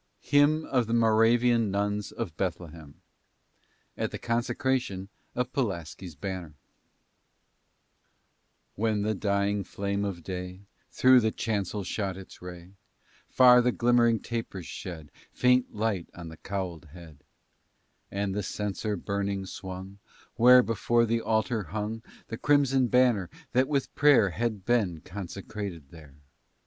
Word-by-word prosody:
HYMN 150 +2 +4
OF 125 -4 0
THE 115 - 0
MORAVIAN 115 0 +3
NUNS 105 +1 -1
OF 100 -9 -5
BETHLEHEM 85 -4 -5 1.0
AT - - -2
THE - - -6
CONSECRATION 120 -4 -1 0.3
OF 125 +1 -2
PULASKI'S 90 - -3
BANNER 90 -5 -6 2.2
When 105 -1 0
the 110 +1 0
dying 100 0 0
flame 100 +1 -3
of 95 -4 -4
day 90 +1 -6 0.3
Through 130 0 +5
the 110 -2 +1
chancel 105 -2 -2
shot 95 0 -3
its 95 - -12
ray, 90 0 -10 0.6
Far 125 -1 +7
the 125 +1 +2
glimmering 120 -2 +3
tapers 115 -6 -5
shed 80 -5 -8 0.2
Faint 125 0 +2
light 105 -5 -1
on 85 -1 -8
the 80 - -11
cowlèd 95 -4 -5
head; 80 -3 -14 0.9
And 100 -1 -2
the 105 - -1
censer 105 +1 -3
burning 100 +1 -2
swung, 95 +1 -8 0.4
Where, 125 +1 +7
before 115 +1 +1
the 115 0 0
altar, 110 0 0
hung 105 +6 -4 0.3
The 115 - -5
crimson 135 -3 +3
banner, 120 -8 +3 0.2
that 130 +1 +2
with 140 -2 -1
prayer 140 -9 +5
Had 105 +2 -3
been 100 -10 +1
consecrated 95 -4 -7
there. 75 -5 -14
105 Hz, 125 wpm, -28 LUFS, 95-120 Hz, 2.2 s, Far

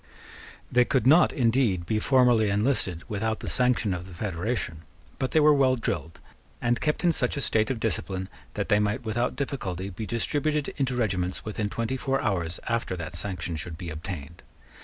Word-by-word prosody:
They 125 0 +5
could 125 -1 +1
not, 155 +7 +6
indeed, 115 - +2
be 110 +2 0
formally 120 -3 +4
enlisted 100 -5 0
without 110 0 -1
the - - -6
sanction 125 -5 +2
of 90 +1 -5
the 95 - -11
federation: 95 -2 -3 0.4
but 130 - 0
they 160 - +3
were 150 0 +6
well 135 -2 +4
drilled, 80 - -3 0.4
and 120 0 +1
kept 150 +2 0
in 175 - +5
such 140 -4 0
a - - 0
state 110 -3 +2
of 130 - -2
discipline 95 -4 -1 0.3
that - - -2
they 105 - +5
might 105 +4 -1
without 120 +3 0
difficulty 100 - -3
be 105 +4 -6
distributed 145 +5 -1
into 135 -3 0
regiments 95 -6 -1
within 105 -1 -2
twenty 115 +4 -2
four 135 +1 0
hours 85 -6 -1
after 115 -5 -1
that 80 -2 -6
sanction 85 -1 -3
should 80 +1 -6
be 85 -1 -6
obtained. 80 -1 -7
110 Hz, 180 wpm, -27 LUFS, 90-125 Hz, 0.4 s, not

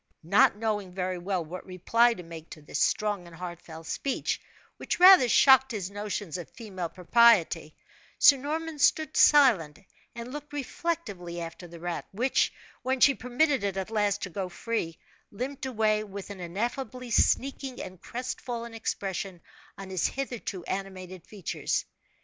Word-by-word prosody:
Not 195 +4 +4
knowing 210 -3 -2
very 185 -1 -2
well 180 -1 -2
what 180 +4 -8
reply 230 +6 +2
to 180 - -9
make 165 -1 -10
to 155 - -11
this - - -4
strong 205 -4 0
and 170 - -13
heartfelt 170 -2 -8
speech, 275 +10 -2 0.4
which - - -3
rather 365 -9 +9
shocked 265 +2 +6
his 195 -3 -4
notions 205 -4 -4
of 175 - -8
female 190 -7 -6
propriety, 180 -5 +3 0.4
Sir 280 - +7
Norman 310 +3 -4
stood 310 +1 +2
silent, 230 - +5 0.4
and 235 +2 -7
looked 295 0 -8
reflectively 245 - -4
after 165 +1 -7
the 170 0 -12
rat, 175 0 -4
which, 250 +7 +1 0.3
when 260 +1 -1
she 275 - +6
permitted 265 +1 +1
it 195 -1 -1
at 190 +3 -4
last 205 -2 0
to 185 - -5
go 190 0 -4
free, 175 -3 -3 0.3
limped 265 +5 -5
away 215 -3 +1
with 200 -1 -8
an 200 - -8
ineffably 240 +7 -4
sneaking 270 +2 +1
and 185 -1 -8
crest 250 +2 -5
fallen 235 -1 -5
expression 195 -4 -4 0.4
on 195 -1 -8
his 185 -3 +1
hitherto 240 -8 -5
animated 185 -2 -6
features. 200 -5 -3
205 Hz, 155 wpm, -28 LUFS, 180-250 Hz, 0.4 s, rather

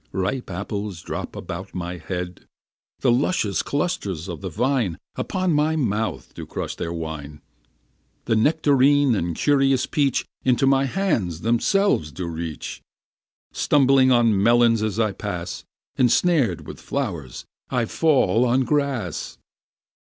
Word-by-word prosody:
Ripe 105 +7 -2
apples 100 -1 -5
drop - - -5
about - - -7
my 90 0 -4
head; 90 +2 -6 0.5
The 125 - +4
luscious 120 - +1
clusters 140 - -2
of 85 -1 -6
the 95 - -4
vine 115 - 0 0.2
Upon 185 -3 -1
my 150 +2 +2
mouth 110 -6 -2
do - - -8
crush - - -4
their 85 - -4
wine; 80 -3 -6 0.9
The 115 - +1
nectarine 145 +1 +4
and 85 -5 -1
curious 135 - +2
peach 140 -4 0 0.2
Into 130 +1 +3
my 135 0 +4
hands 120 - -1
themselves 120 - +2
do 90 +4 -5
reach; 80 -2 -5 0.7
Stumbling 135 -2 +4
on 115 -5 +4
melons 115 0 +4
as 110 0 -1
I 110 -2 +2
pass, 90 -3 -5 0.3
Ensnared 130 - +2
with - - -9
flowers, 85 - -4 0.2
I 120 -2 0
fall 125 - +2
on 125 +1 +3
grass. 130 - -2
115 Hz, 130 wpm, -23 LUFS, 90-135 Hz, 0.9 s, The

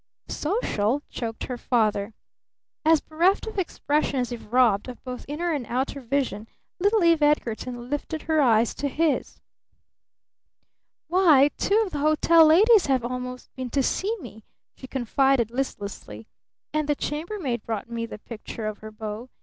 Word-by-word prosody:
"Social?" 290 - -1
choked 225 -2 -5
her 250 -2 -5
father. 215 -3 0 0.7
As 315 -1 +4
bereft 345 +5 +1
of 440 -3 -4
expression 295 -5 0
as 245 0 -2
if 235 -2 -8
robbed 240 -5 +3
of 245 - -10
both 250 -1 -7
inner 335 +5 -2
and 285 -4 -2
outer 265 +3 -2
vision, 235 -5 -2 0.3
little 405 +2 +3
Eve 335 -2 +4
Edgarton 245 -4 0
lifted 290 +3 -4
her 315 -2 +2
eyes 230 -3 +3
to 285 - -3
his. 305 +2 -1 1.7
"Why 310 -5 +5
two 430 +3 +2
of 380 - -7
the 295 - -3
hotel 310 +2 +5
ladies 405 +5 +6
have 260 -3 +1
almost 250 0 -6
been 260 -1 -5
to 275 +2 +1
see 420 - -1
me," 220 - -11 0.3
she 260 - -11
confided 260 -1 +1
listlessly. 200 - -5 0.5
"And 305 -1 -1
the 295 - +3
chambermaid 300 - -3
brought 220 -1 -4
me 230 -1 -4
the - - -8
picture 220 0 -8
of 215 -1 -4
her 215 - -9
beau. 215 +3 -7
265 Hz, 155 wpm, -25 LUFS, 235-315 Hz, 1.7 s, ladies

